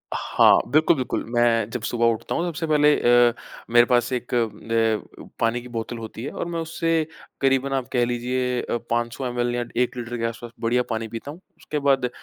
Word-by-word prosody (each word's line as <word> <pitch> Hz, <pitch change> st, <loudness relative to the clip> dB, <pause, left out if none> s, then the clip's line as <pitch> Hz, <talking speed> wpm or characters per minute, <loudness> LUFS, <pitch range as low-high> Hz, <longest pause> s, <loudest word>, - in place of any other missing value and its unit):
हाँ, -, -, +4 dB
बिल्कुल-बिल्कुल। 150 Hz, -3 st, +2 dB
मैं 115 Hz, -2 st, +3 dB
जब 120 Hz, -1 st, -4 dB
सुबह 120 Hz, -1 st, 0 dB
उठता 110 Hz, -, -4 dB
हूँ, 170 Hz, -, 0 dB
सबसे 165 Hz, -1 st, -3 dB
पहले 150 Hz, -1 st, +4 dB, 0.3 s
अ, -, -, -5 dB, 0.4 s
मेरे 120 Hz, 0 st, +6 dB
पास 120 Hz, 0 st, +2 dB
1 125 Hz, 0 st, -4 dB
अ, 115 Hz, -1 st, -1 dB
पानी 115 Hz, +1 st, +1 dB
की 125 Hz, -, -11 dB
बोतल 115 Hz, 0 st, -5 dB
होती 110 Hz, +1 st, -8 dB
है 145 Hz, -, -4 dB
और -, -, -4 dB
मैं 170 Hz, -1 st, -3 dB
उससे 165 Hz, -1 st, 0 dB, 0.3 s
क़रीबन, 135 Hz, 0 st, +2 dB
आप 130 Hz, -2 st, -1 dB
कह 120 Hz, -1 st, +3 dB
लीजिए, 125 Hz, +1 st, -1 dB
अ, 120 Hz, -, -2 dB
500 120 Hz, +2 st, -1 dB
एमएल 120 Hz, 0 st, -1 dB
या 120 Hz, -, -1 dB, 0.2 s
1 125 Hz, -, -1 dB
लीटर 120 Hz, 0 st, -4 dB
के 115 Hz, -, -4 dB
आस-पास 115 Hz, +1 st, -5 dB
बढ़िया 120 Hz, +2 st, +1 dB
पानी 115 Hz, 0 st, -2 dB
पीता 115 Hz, +6 st, -7 dB
हूँ। 165 Hz, -, -12 dB, 0.2 s
उसके 150 Hz, -, -4 dB
बाद 135 Hz, -3 st, +2 dB
120 Hz, 195 wpm, -23 LUFS, 115-135 Hz, 0.4 s, मेरे